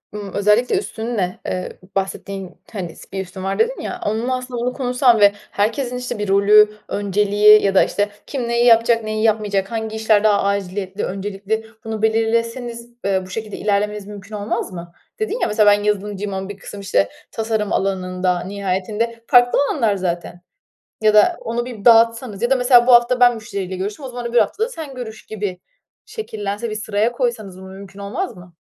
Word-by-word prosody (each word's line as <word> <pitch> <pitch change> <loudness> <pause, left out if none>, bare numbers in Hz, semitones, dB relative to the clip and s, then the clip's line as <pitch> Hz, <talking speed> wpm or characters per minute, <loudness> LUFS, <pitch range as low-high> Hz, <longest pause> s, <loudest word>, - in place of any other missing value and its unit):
ımm, 205 -2 -7
özellikle 210 - +2
üstünle, 220 - -3
eee, 185 0 -4 0.2
bahsettiğin, 195 -1 -4 0.2
hani, 180 -5 -5
s - - -15
"bir 190 - -3
üstün 185 +1 -9
var" 195 0 -2
dedin, - - +1
ya, 365 - -5
onunla, 235 +4 0
aslında, 250 -1 -6
onu 250 +1 -1
konuşsan 250 -2 +2
ve 205 -1 +7 0.2
herkesin, 245 +4 -1
işte, 250 -3 -5
bir 210 - -2
rolü, 210 +2 +5
önceliği 205 +1 +4
ya 195 -1 +1
da, - - +7
işte, 205 0 -1 0.2
kim 255 -4 -3
neyi 235 0 +2
yapacak, 230 -1 +5
neyi 215 0 -2
yapmayacak, 210 -3 +1
hangi 220 -1 -3
işler 220 -1 +3
daha 205 -2 +3
aciliyetli, 200 0 -2
öncelikli, 200 +3 -3 0.2
bunu 220 -1 -5
belirleseniz, 230 +2 -1 0.2
eee, 195 -1 +1
bu 185 - -13
şekilde 215 +1 -5
ilerlemeniz 210 0 -1
mümkün 205 0 -9
olmaz 205 -1 -3
mı? 170 -1 -8 0.3
Dedin 435 +2 -2
ya - - +1
mesela, 210 -1 +4
"Ben 205 0 +2
yazılımcıyım 205 -1 -2
ama 190 +1 -4
bir 205 - -7
kısım, 200 0 -9
işte, 100 - +1 0.2
tasarım 220 -2 -1
alanında." 185 -2 0
nihayetinde 205 +4 -3
farklı 245 0 +5
alanlar 225 -8 +1
zaten. 175 -1 -4 0.6
Ya 215 -1 +4
da 340 +12 +5
onu 235 +1 -2
bir 240 -4 -9
dağıtsanız 230 -2 +4
ya 240 - +1
da 270 - +4
mesela, 245 -1 +5
"Bu 250 - +7
hafta 240 +1 +5
ben 245 -1 +6
müşteriyle 200 -4 -5
görüştüm. 205 +8 -5
O - - -4
zaman 245 -1 -6
öbür 235 0 -1
hafta 235 - +2
da 460 - -1
sen 315 - -8
görüş." 220 -4 -8
gibi 205 -4 -4 0.5
şekillense 215 - -5
bir 215 - -4
sıraya 215 +2 0
koysanız 235 -7 -3
bunu 190 0 -11
mümkün 195 +1 -11
olmaz 230 - -4
mı? 175 -1 -14
210 Hz, 185 wpm, -20 LUFS, 195-235 Hz, 0.6 s, ve